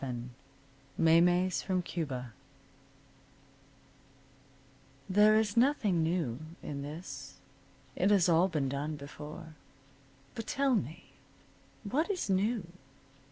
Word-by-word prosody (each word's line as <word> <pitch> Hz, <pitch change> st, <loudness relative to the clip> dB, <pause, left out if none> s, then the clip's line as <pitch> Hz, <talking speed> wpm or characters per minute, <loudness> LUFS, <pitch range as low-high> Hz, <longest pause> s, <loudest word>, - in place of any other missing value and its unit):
VII 125 Hz, -1 st, -5 dB, 0.7 s
MAYMEYS 175 Hz, +3 st, +4 dB
FROM 185 Hz, -2 st, -1 dB
CUBA 130 Hz, -10 st, -4 dB, 2.7 s
There 210 Hz, +3 st, +5 dB
is 215 Hz, -2 st, +1 dB
nothing 230 Hz, -, +3 dB
new 160 Hz, -7 st, -1 dB, 0.2 s
in 140 Hz, -1 st, -5 dB
this. 155 Hz, +5 st, -8 dB, 0.6 s
It 190 Hz, -, +2 dB
has 195 Hz, -4 st, +4 dB
all 170 Hz, +2 st, +4 dB
been 155 Hz, -7 st, -1 dB
done 145 Hz, +3 st, -3 dB
before. 150 Hz, +3 st, -9 dB, 0.8 s
But 225 Hz, -, -6 dB
tell 275 Hz, -1 st, +1 dB
me, 160 Hz, -, -3 dB, 0.7 s
what 280 Hz, -, 0 dB
is 365 Hz, -, -1 dB
new? 205 Hz, +2 st, +1 dB
175 Hz, 100 wpm, -31 LUFS, 150-205 Hz, 2.7 s, There